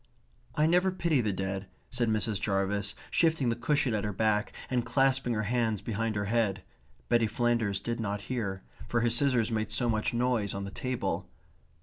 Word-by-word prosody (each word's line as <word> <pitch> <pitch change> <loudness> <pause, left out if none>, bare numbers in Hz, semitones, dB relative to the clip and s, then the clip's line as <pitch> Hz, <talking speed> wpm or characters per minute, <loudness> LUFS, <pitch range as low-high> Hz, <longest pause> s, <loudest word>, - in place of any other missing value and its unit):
"I 150 - +3
never 180 +3 +3
pity 170 -7 +1
the 110 -3 0
dead," 95 0 -3 0.2
said 120 -2 0
Mrs. 110 -2 0
Jarvis, 100 0 0 0.2
shifting 160 -7 +2
the 115 - +1
cushion 135 0 +1
at 105 - 0
her 105 - -1
back, 105 +1 +1 0.2
and 125 -2 0
clasping 135 -2 +2
her 110 - 0
hands 110 -2 0
behind 115 0 -1
her 100 0 -1
head. 100 -3 0 0.4
Betty 115 -1 +3
Flanders 115 -4 +1
did 120 0 -3
not 100 -2 -2
hear, 100 -4 -3 0.2
for 120 - +1
her 120 0 +2
scissors 120 -2 +2
made 110 -1 -1
so 120 +2 0
much 110 -1 +1
noise 120 -4 0
on 100 - -3
the 100 - -6
table. 125 +2 -3
115 Hz, 185 wpm, -30 LUFS, 100-125 Hz, 0.4 s, I